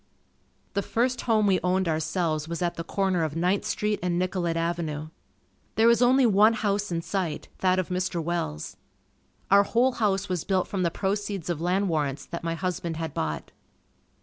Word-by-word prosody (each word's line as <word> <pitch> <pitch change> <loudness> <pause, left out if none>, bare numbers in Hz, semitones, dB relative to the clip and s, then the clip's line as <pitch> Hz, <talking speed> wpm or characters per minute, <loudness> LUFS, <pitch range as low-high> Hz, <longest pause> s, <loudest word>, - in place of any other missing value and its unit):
The 200 - +1
first 245 +5 0
home 215 -2 +4
we 190 -2 +3
owned 185 0 +1
ourselves 160 -1 -1
was 170 +2 -3
at 175 - 0
the 165 - -5
corner 190 -1 0
of 155 -1 -2
Ninth 180 +4 +1
Street 210 0 -1
and 175 -1 0
Nicollet 180 -2 -1
Avenue. 165 -2 -2 0.7
There 220 - +4
was 235 +1 +5
only 255 +2 +5
one 215 +1 +5
house 205 -2 -1
in 165 -1 -1
sight, 180 -6 -3
that 185 -1 +3
of 185 - -1
Mr. 180 -1 -1
Welles. 160 - -3 0.7
Our 200 0 +8
whole 240 +5 +2
house 200 -5 0
was 180 -4 -2
built 190 -2 0
from 195 - -2
the 170 - +2
proceeds 195 -1 -2
of 165 -2 -4
land 185 +3 +1
warrants 145 -4 -1
that 170 - -6
my 165 0 -1
husband 170 -2 -3
had 160 -3 -4
bought. 75 -1 -3
180 Hz, 180 wpm, -26 LUFS, 165-200 Hz, 0.7 s, Our